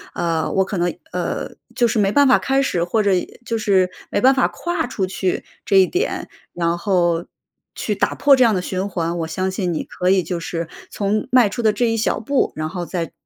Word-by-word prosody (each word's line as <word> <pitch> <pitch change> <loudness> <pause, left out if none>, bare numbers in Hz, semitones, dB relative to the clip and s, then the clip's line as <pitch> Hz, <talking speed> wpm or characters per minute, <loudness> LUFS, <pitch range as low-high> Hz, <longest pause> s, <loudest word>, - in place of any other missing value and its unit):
呃， 165 -2 -1
我 190 - +2
可 195 - -4
能， 175 0 +1 0.2
呃， 180 -1 -3 0.3
就 240 -2 +3
是 220 -1 0
没 195 -1 +2
办 285 +2 +5
法 260 - +5
开 270 0 +1
始， 180 -11 0
或 210 +5 +1
者 200 - +2 0.3
就 230 - -2
是 190 -4 +3 0.2
没 - - 0
办 260 +5 +5
法 265 - +2
跨 345 -5 -3
出 195 -6 -2
去 185 0 -2 0.2
这 200 - 0
一 190 -1 +7
点， 375 - -2 0.3
然 170 -1 0
后 175 -3 +1 0.5
去 - - -2
打 - - 0
破 285 -1 +5
这 255 - +4
样 225 -4 +4
的 180 - 0
循 185 +2 -2
环。 170 -2 -2
我 165 - -2
相 185 +4 -2
信 185 -2 -2
你 - - -2
可 180 - -2
以 190 -2 +3
就 175 -2 -3
是 165 0 -4 0.2
从 205 +2 -1
迈 250 -3 +6
出 240 - -4
的 220 - +4
这 235 +3 0
一 - - 0
小 220 - 0
步， 270 +5 0
然 155 0 -3
后 175 +1 -5
在 170 -2 -4
190 Hz, 245 characters per minute, -20 LUFS, 175-230 Hz, 0.5 s, 一